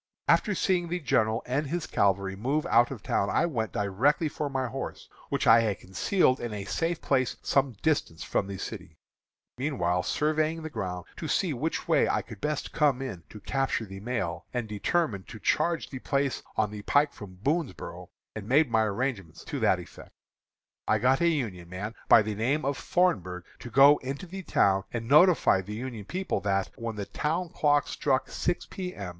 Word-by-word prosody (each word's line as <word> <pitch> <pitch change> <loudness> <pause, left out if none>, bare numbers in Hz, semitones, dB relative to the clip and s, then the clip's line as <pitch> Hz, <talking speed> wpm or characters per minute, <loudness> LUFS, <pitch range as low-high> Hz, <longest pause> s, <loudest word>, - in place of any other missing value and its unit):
"After 210 -3 +3
seeing 180 -2 +1
the 180 +2 -2
general 110 -7 +1
and 140 +4 -1
his 170 +3 -2
cavalry 95 -1 +1
move 140 - -1
out 120 -6 +4
of 125 -7 -8
town, 100 - 0
I 170 - +2
went 115 - -2
directly 125 - +1
for 145 0 -3
my 135 -1 -1
horse, 130 +2 -6 0.2
which 140 0 -1
I 115 -2 +8
had 110 -4 0
concealed 130 - +1
in 115 -3 -4
a 100 -1 -5
safe 165 - -2
place 130 -3 +1
some 135 -2 +2
distance 145 - 0
from 100 - -1
the 100 -1 -5
city, - - -7 0.6
meanwhile 90 - 0
surveying 155 - 0
the 160 - -6
ground 90 - -4
to 160 - -5
see 170 +1 +1
which 150 +6 -3
way - - +3
I - - 0
could 110 -4 -11
best 150 -1 -2
come 145 -5 +3
in 130 -10 -5
to 105 - -10
capture 135 -1 -1
the 95 -1 -9
mail, 105 -6 -3
and 120 -3 -3
determined 105 - -1
to 110 - -9
charge 170 +7 0
the 130 - -5
place 140 +1 -1 0.2
on 105 -1 +1
the 105 -1 -7
pike 145 +7 +2
from 95 -3 -10
Boonsboro', 150 - -2 0.3
and 105 0 -7
made 140 0 +4
my 110 - +4
arrangements 100 - -2
to - - -4
that - - +3
effect. - - -12 0.8
I 110 - +3
got 130 +6 +2
a 170 - +4
Union 110 - -2
man, 100 +5 -5 0.2
by 110 - +8
the 110 0 -3
name 130 +8 0
of 140 0 0
Thornburgh, 95 - 0 0.2
to 120 - -8
go 140 +5 +7
into 135 +6 -5
the 190 +2 -7
town 95 - +2
and 115 -1 -4
notify 150 - +5
the 105 +3 -7
Union 115 -3 -6
people 185 - -2
that, 100 -1 0
when 115 -1 -5
the 100 -1 -4
town 165 - -2
clock 145 -3 +2
struck 135 -2 0
six 175 - -1
P. 180 -1 -6
M. 100 -3 -5
130 Hz, 195 wpm, -28 LUFS, 105-150 Hz, 0.8 s, I